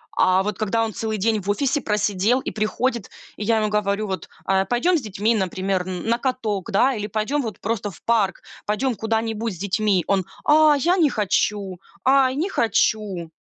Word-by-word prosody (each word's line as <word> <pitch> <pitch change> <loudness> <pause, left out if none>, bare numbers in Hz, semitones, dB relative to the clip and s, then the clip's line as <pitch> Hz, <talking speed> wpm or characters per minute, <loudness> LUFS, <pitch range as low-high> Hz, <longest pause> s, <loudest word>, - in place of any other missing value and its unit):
а 185 +1 +3
вот 210 -1 -4
когда 225 +1 +1
он 220 - -5
целый 220 +1 -3
день 215 +1 +1
в 195 - -6
офисе 275 +6 +1
просидел 210 +2 +1
и - - -4
приходит, 225 +1 -1 0.3
и - - -4
я 225 +2 +2
ему 215 -1 +1
говорю: 210 0 0
"Вот, 190 -1 -5 0.2
а 190 0 +2
пойдем 290 - +2
с - - -3
детьми, 215 +1 0
например, 190 -1 -1
н 185 +2 -5
на 235 +1 +1
каток, 225 -7 -2
да? 250 +7 +3
Или 210 -1 -3
пойдем 215 +8 -1
вот 220 -7 -6
просто 215 -1 -2
в 170 - -17
парк, 215 -5 +1 0.2
пойдем 220 +5 0
куда-нибудь 225 0 -2
с - - -12
детьми". 200 -1 +1
Он: 195 -2 +1 0.2
"А 305 0 +6
я 345 +6 +2
не 320 -5 +4
хочу, 205 -4 -1 0.3
ай, 265 -1 +4
не 330 +8 -1
хочу". 210 - 0
215 Hz, 190 wpm, -22 LUFS, 195-240 Hz, 0.3 s, А